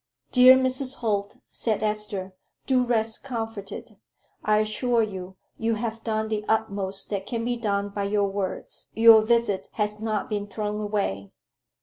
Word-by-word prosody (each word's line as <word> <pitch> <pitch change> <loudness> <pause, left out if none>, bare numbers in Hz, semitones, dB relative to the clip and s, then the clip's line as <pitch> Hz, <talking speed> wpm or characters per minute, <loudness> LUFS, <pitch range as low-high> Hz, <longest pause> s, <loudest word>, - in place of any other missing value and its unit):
"Dear 255 0 +8
Mrs. 260 +1 +1
Holt," 205 -3 -2
said 220 -2 -1
Esther, 210 -3 -1 0.3
"do 255 -2 +3
rest 225 -2 0
comforted. 225 -4 -6 0.5
I 215 0 +3
assure 230 +2 +1
you, 190 -3 -6 0.2
you 225 0 0
have 225 0 -4
done 220 -1 -1
the 215 -1 -2
utmost 200 -3 -1
that 200 -1 -3
can 230 -2 -3
be 245 0 0
done 205 -3 -1
by 200 0 -3
your 205 0 +1
words. 195 -1 -4
Your 225 -1 +8
visit 230 -3 +1
has 210 -1 -1
not 215 -2 -2
been 205 -1 -3
thrown 210 0 -3
away. 195 - -2
215 Hz, 150 wpm, -25 LUFS, 200-230 Hz, 0.5 s, Dear